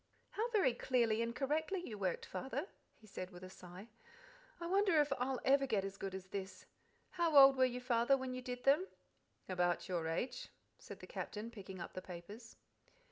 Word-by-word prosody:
"How 455 +3 -1
very 400 - +3
clearly 235 -3 +1
and 230 0 -2
correctly 315 +7 -1
you 220 - -5
worked, 190 -4 -2
Father," 265 - -4 0.3
he 220 - -19
said 185 -3 -6
with 180 -1 -12
a 185 - -9
sigh. 180 +3 -11 0.7
"I 340 - -5
wonder 375 -2 +3
if 295 0 +3
ever - - -6
I'll 265 +1 +3
get 200 -5 +1
as 195 0 -5
good 195 -1 -4
as 190 -1 -6
this! 190 -1 -6 0.5
How 340 -4 +2
old 270 0 +10
were 260 0 +5
you, 250 -1 -2
Father, 245 +2 +3
when 260 -1 -4
you 255 - -4
did 250 0 -6
them?" 300 +8 +4 0.6
"About 180 -1 0
your 175 -4 -1
age," 165 +10 -3 0.3
said - - -10
the - - -8
Captain, 215 +2 -5
picking 190 -4 -9
up 170 - -7
the 185 - -5
papers. 200 +7 -10
235 Hz, 190 wpm, -37 LUFS, 190-275 Hz, 0.7 s, old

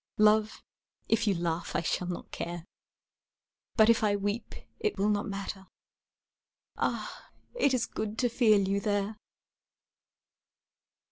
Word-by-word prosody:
Love, 215 0 +3 0.5
if 225 0 +2
you 200 - +3
laugh 170 -1 -2
I - - +2
shall 175 +1 -1
not 180 - -6
care, 170 -1 -5 1.1
But 220 -1 +6
if 230 0 +4
I 205 -1 +3
weep 205 +3 -3 0.2
it 430 -1 -1
will 200 +2 +2
not 205 +2 0
matter, 195 -1 -5 1.1
Ah, - - -3 0.2
it 485 - +2
is 240 - +1
good 215 0 -4
to 250 - +2
feel 215 -5 +4
you 200 +1 +1
there! 205 0 -1
205 Hz, 130 wpm, -30 LUFS, 195-220 Hz, 1.1 s, But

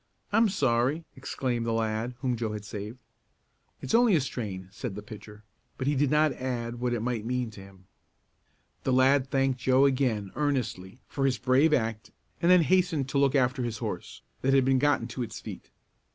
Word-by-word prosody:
I'm 225 +1 +4
sorry!" 135 - +1
exclaimed 120 -3 -3
the 115 0 -1
lad 115 +2 -1
whom 130 -3 0
Joe 110 -2 -3
had 105 -1 -6
saved. 105 +3 -7 0.9
"It's - - -3
only 230 -4 +5
a - - +4
strain," 105 -8 -5
said 100 0 -6
the 105 - -7
pitcher, 105 0 -11 0.3
but 130 - -3
he 145 - +2
did 145 0 +2
not 150 0 +3
add 120 -2 -4
what 120 0 0
it 115 - -3
might 120 -3 -2
mean 125 0 -2
to 105 - -11
him. 95 -1 -16 1.0
The 130 - +1
lad 130 +1 +4
thanked 135 -1 +1
Joe 130 +2 +4
again, 125 -8 0
earnestly, 120 -9 -2
for 135 -1 0
his 130 -2 0
brave 130 +6 +3
act 115 -6 -1 0.3
and 170 - +3
then 180 -2 +7
hastened 175 -6 +1
to 140 - +1
look 140 0 +3
after 130 0 +2
his 120 -3 -3
horse, 105 -6 -6 0.2
that 135 +1 +3
had 135 -2 +4
been 135 -1 +3
gotten 145 -4 +2
to 125 - -5
its 115 -1 -5
feet. 105 -5 -9
125 Hz, 195 wpm, -28 LUFS, 110-135 Hz, 1.0 s, then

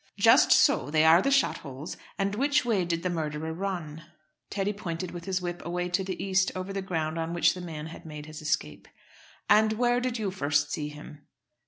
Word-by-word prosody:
"Just - - +6
so. - - +4
They 155 +1 +3
are 165 +3 +7
the 275 - +1
shot 275 -1 +2
holes. 140 +2 -8 0.2
And 200 0 0
which 285 +5 +2
way 210 -7 +1
did 170 -1 -2
the 180 - 0
murderer 160 -1 -3
run?" 170 -4 -4 0.5
Teddy 200 +1 -1
pointed 180 -3 -5
with 175 -1 -8
his 185 -1 -2
whip 175 0 -4
away 175 +1 -2
to 180 +2 0
the 185 -1 -4
east, 190 -1 +1
over 185 +1 -4
the 195 - -2
ground 165 -3 -2
on 165 +1 -3
which 170 - +4
the 180 - -7
man 160 -3 -6
had 160 +1 -10
made 150 -2 -8
his 155 +1 -9
escape. 75 - -2 0.6
"And 215 0 +5
where 245 +2 +2
did 250 -1 -2
you 210 -4 -2
first 145 -4 0
see 150 -1 -2
him?" 150 0 -12
175 Hz, 210 wpm, -28 LUFS, 155-195 Hz, 0.6 s, are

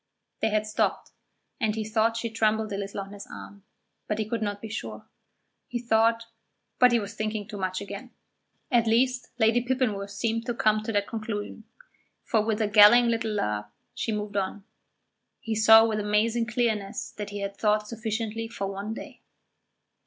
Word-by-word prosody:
They 220 - +1
had 215 0 +1
stopped, 215 - -1 0.5
and 215 -3 0
he 220 - -2
thought 225 +1 +1
she 230 0 -3
trembled 220 -1 +1
a - - -1
little 200 0 -4
on 195 +1 -9
his 200 0 -9
arm, 200 -1 -11 0.4
but 210 - -1
he 215 -1 -2
could 230 0 -2
not 205 -1 -2
be 220 - -7
sure. 220 - -6 0.6
He 245 - -3
thought 230 -1 +2 0.6
but 250 -1 +7
he 235 - +4
was 205 0 -6
thinking 215 -1 -3
too 210 -2 -7
much 185 0 -2
again; 200 +5 -7 0.6
at 235 -2 +3
least, 250 +2 +2
Lady 230 +1 +3
Pippinworth 245 -6 -1
seemed 230 +3 -2
to 240 - -1
come 215 -1 +2
to 215 - -4
that 205 -1 +1
conclusion, 220 -1 -5 0.6
for 220 - +2
with 220 0 0
a - - +1
galling 215 +4 +7
little 225 -1 -1
laugh 105 - -2 0.2
she 225 - -2
moved 210 -1 -3
on. 195 +1 -2 0.8
He 225 -4 -3
saw 220 +1 +7
with 220 -1 -1
amazing 220 +3 +1
clearness 220 -4 -1
that 210 -1 -6
he 205 0 -5
had 200 0 -4
thought 210 0 +1
sufficiently 225 0 -3
for 225 -3 -4
one 200 +3 -4
day. - - -10
220 Hz, 180 wpm, -27 LUFS, 205-230 Hz, 0.8 s, but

